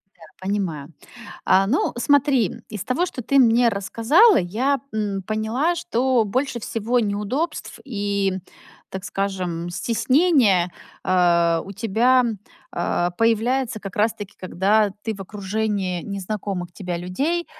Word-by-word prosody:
Да. 175 - -29 0.2
Понимаю. 180 -6 -3 0.5
А, 195 +1 +4
ну, 250 +9 +1
смотри, 270 - +2
из 210 -3 -6
того, 325 +8 0
что 255 - -6
ты 275 +4 +2
мне 240 -1 +5
рассказала, 230 - +4
я, 245 +10 0
м, 205 -3 -2
поняла, 220 - 0
что 255 -6 +1
больше 245 +3 -2
всего 225 +3 -1
неудобств 210 +10 -3
и, 200 -5 -1 0.6
так 190 0 -6
скажем, 185 -4 -3
стеснения, 230 - +2 0.3
э, 170 -2 +3
у 195 - -8
тебя, 230 +5 +3 0.5
э, 175 0 0
появляется, 230 +1 +1
как 195 -2 -8
раз 220 +1 +2
таки 205 -3 -9
когда 200 +3 +2
ты 220 - -3
в 195 - -12
окружении 200 -2 -2
незнакомых 195 -2 -4
тебя 180 -2 -4
людей, 280 - -2
210 Hz, 125 wpm, -22 LUFS, 190-245 Hz, 0.6 s, мне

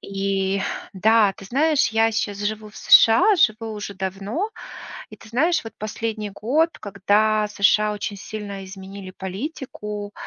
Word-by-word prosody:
И 195 0 -1 0.3
да, 210 +1 +4
ты - - -12
знаешь, 285 +3 +2
я 225 0 +3
щас 205 -2 -2
живу 215 +1 -4
в - - -17
США, 230 - +6
живу 225 -8 +1
уже 205 -1 -6
давно. 195 - -3 0.6
И - - -11
ты - - -16
знаешь, 315 +7 +1
вот 225 - -9
последний 215 0 -4
год, 270 - +1
когда 210 +1 +1
США 210 +1 +2
очень 205 0 -4
сильно 205 -1 -7
изменили 190 0 -9
политику, 210 - -6
210 Hz, 140 wpm, -22 LUFS, 200-225 Hz, 0.6 s, США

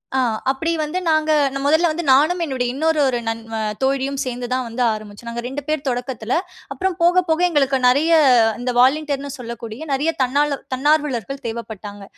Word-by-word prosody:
ஆ. - - +3 0.3
அப்பிடி 325 +5 -2
வந்து, 305 +5 -2
நாங்க 310 0 +2 0.2
நா 275 - -3
மொதல்ல 320 +4 +3
வந்து 345 +2 -3
நானும் 310 +7 +4
என்னுடை 260 -4 -2
இன்னொரு 315 +2 +1
ஒரு 245 -2 0
நண் 225 0 -2
வ - - -2 0.3
தோழியும் 270 0 0
சேர்ந்து 245 -1 -4
தான் 255 0 -1
வந்து 230 +2 -2
ஆரம்பிச்சோம். 215 +2 -9
நாங்க 235 0 -4
2 270 +3 -5
பேர் 305 -2 -2
தொடக்கத்துல. 245 -1 -3 0.4
அப்பறம் 375 -1 -2
போக 355 +1 +4
போக 320 +2 +2
எங்களுக்கு 275 -4 +2
நெறைய 285 +7 +3 0.5
இந்த 250 +1 -2
வாலண்டியர்ன் 280 +1 +2
னு - - -6
சொல்லக்கூடிய 235 0 -7
நெறைய 285 +4 +1
தன்னார் 285 +3 +1 0.2
தன்னார்வலர்கள் 275 -2 0
தேவப்பட்டாங்க. 215 -3 -7
270 Hz, 175 wpm, -20 LUFS, 245-310 Hz, 0.5 s, நானும்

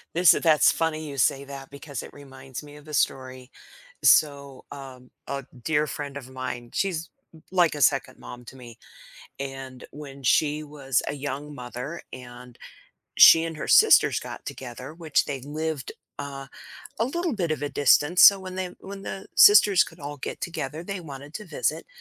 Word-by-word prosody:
Listen, 175 0 +5
that's 155 -2 +5
funny 155 -1 -2
you 140 -1 -8
say 135 +2 +2
that 135 -1 -10
because 140 -2 -7
it - - -11
reminds 135 -2 -10
me 145 0 -13
of 150 0 -15
the 155 - -11
story. 130 -3 -2 0.5
So, 140 -3 +3
um, 130 -3 -11 0.2
a 140 -1 -4 0.2
dear 150 -1 +1
friend 140 -1 -6
of 130 -2 -10
mine, 125 -2 -6
she's 170 -4 -2 0.2
l 160 - -16
like 175 -4 +3
a 145 - -6
second 135 -2 +1
mom 120 0 -11
to 135 - -12
me, 120 -3 -13 0.6
and 135 -2 -7
when 140 -2 -11
she 150 +4 +2
was 140 -3 -2
a - - -2
young 145 +1 -6
mother, 125 +5 -7
and 125 -1 -11 0.6
she 165 0 +8
and 165 -1 -5
her - - -6
sisters - - +5
got - - -9
together, 130 +2 -8
which 160 -3 0
they 140 -3 -5
lived, 150 -1 -4 0.3
uh, 135 -1 -7 0.5
a 230 - +3
little 340 +2 -2
bit 175 -6 -2
of 145 -2 -4
a 145 - -1
distance, 145 +5 +3
so 200 - +9
when 185 -1 -8
they 185 -1 -3
when 195 0 -9
the 195 0 -7
sisters 410 - +7
could 165 - -14
all 145 0 -7
get - - -6
together, 155 -2 -5
they 195 -1 -5
wanted 145 -2 -10
to 210 - -7
visit, - - -2
145 Hz, 180 wpm, -25 LUFS, 135-160 Hz, 0.6 s, so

